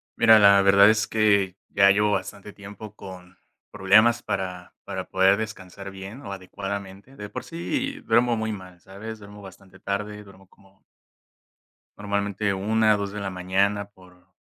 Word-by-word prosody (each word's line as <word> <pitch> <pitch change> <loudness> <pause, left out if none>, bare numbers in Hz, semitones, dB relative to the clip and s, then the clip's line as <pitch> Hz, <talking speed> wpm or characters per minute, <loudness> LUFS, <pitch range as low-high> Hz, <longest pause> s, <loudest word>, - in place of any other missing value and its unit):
Mira, 110 -1 +6
la 100 -1 +6
verdad 100 +1 +6
es 110 -1 +1
que 100 -4 +2
ya 100 0 +5
llevo 105 +1 +2
bastante 100 0 -4
tiempo 105 +1 -11
con 90 -2 -12 0.3
problemas 110 +4 +4
para 90 -2 -5
para - - -6
poder 95 +1 +4
descansar 100 -2 -7
bien 95 +7 -10
o 100 - -8
adecuadamente. 100 +4 -7
De 105 - -7
por - - -7
sí 265 - -4
duermo 120 +1 +2
muy 110 0 -2
mal, 90 -3 -11
¿sabes? 105 +5 -9
Duermo 100 0 -13
bastante 95 -1 -15
tarde. 105 +1 -4
Duermo 95 -1 -18
como 95 0 -26 1.1
normalmente 100 0 -2
1:00 110 +2 +2
o - - -2
2:00 100 -1 -4
de 105 - -6
la 100 -1 -4
mañana 95 +2 0
por 90 -2 -21
100 Hz, 160 wpm, -24 LUFS, 95-105 Hz, 1.1 s, Mira